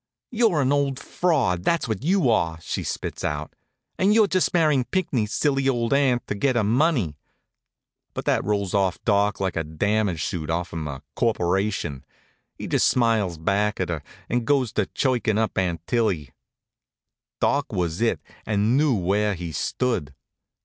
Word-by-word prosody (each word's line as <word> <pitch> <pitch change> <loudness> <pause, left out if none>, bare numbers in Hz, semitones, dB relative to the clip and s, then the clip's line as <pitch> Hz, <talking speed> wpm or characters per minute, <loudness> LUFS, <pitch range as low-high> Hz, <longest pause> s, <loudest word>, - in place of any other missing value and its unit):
"You're 220 - +2
an 130 - +1
old 140 -2 +1
fraud, 135 - 0
that's 170 - +1
what 110 +1 -3
you 170 -6 +3
are!" 80 -7 +1
she 85 - -4
spits - - -4
out. 75 +1 -3 0.5
"And 200 +3 +4
you're 220 -1 +6
just 185 -2 +1
marrying 155 -6 +3
Pinckney's 130 - -1
silly 135 +2 +1
old 120 -1 0
aunt 135 -3 +2
to - - -3
get 130 +5 0
her 115 - +2
money." 115 - +1 1.0
But - - -4
that - - +2
rolls 100 -2 -1
off 95 -3 +1
Doc 100 -2 +2
like 95 -1 -1
a 80 - 0
damage 90 +2 0
suit 80 -5 -3
off'm 85 -2 -3
a 70 -2 -7
corporation. 95 - 0 0.5
He - - -6
just - - +2
smiles 110 -8 +2
back 100 +6 0
at 90 - -1
her, 80 -4 -2 0.3
and 120 -1 -1
goes 135 -6 +2
to 105 - 0
chirkin' 120 -5 0
up 110 0 0
Aunt 85 -3 -1
Tillie. 95 - 0 1.1
Doc 140 0 +1
was 90 -2 -2
it, 115 - +1 0.2
and 105 +3 +1
knew 145 -2 +3
where 100 +2 +1
he 85 -2 -6
stood. 75 - -2
105 Hz, 165 wpm, -24 LUFS, 90-135 Hz, 1.1 s, you're